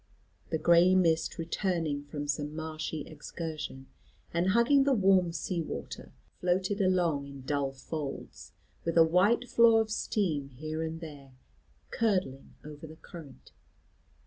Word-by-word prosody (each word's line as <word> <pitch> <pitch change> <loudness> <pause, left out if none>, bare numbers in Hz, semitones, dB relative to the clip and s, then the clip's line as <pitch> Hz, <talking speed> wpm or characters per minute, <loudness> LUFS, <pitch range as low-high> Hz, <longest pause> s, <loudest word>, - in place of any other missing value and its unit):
The 160 - 0
gray 170 +3 +5
mist 165 -3 +2
returning 165 -4 -1
from 145 0 -5
some 145 +1 -2
marshy 155 -1 -4
excursion, 155 -2 -7 0.5
and 170 +2 +1
hugging 235 +7 +4
the 275 -1 +3
warm 190 -4 +4
sea 170 +2 -2
water, 160 - -7 0.3
floated 185 +3 0
along 175 -7 +1
in 140 -1 -10
dull 140 0 -1
folds, 140 +1 -7 0.3
with 165 0 -1
a 165 - +9
white 200 +9 +3
flaw 230 -2 +5
of 220 -1 -1
steam 165 -10 -1
here 155 +4 -5
and 160 +1 -4
there 145 -5 -10 0.6
curdling 185 - -1
over 150 +1 -9
the 155 - -11
current. 160 -3 -13
165 Hz, 135 wpm, -30 LUFS, 150-185 Hz, 0.6 s, a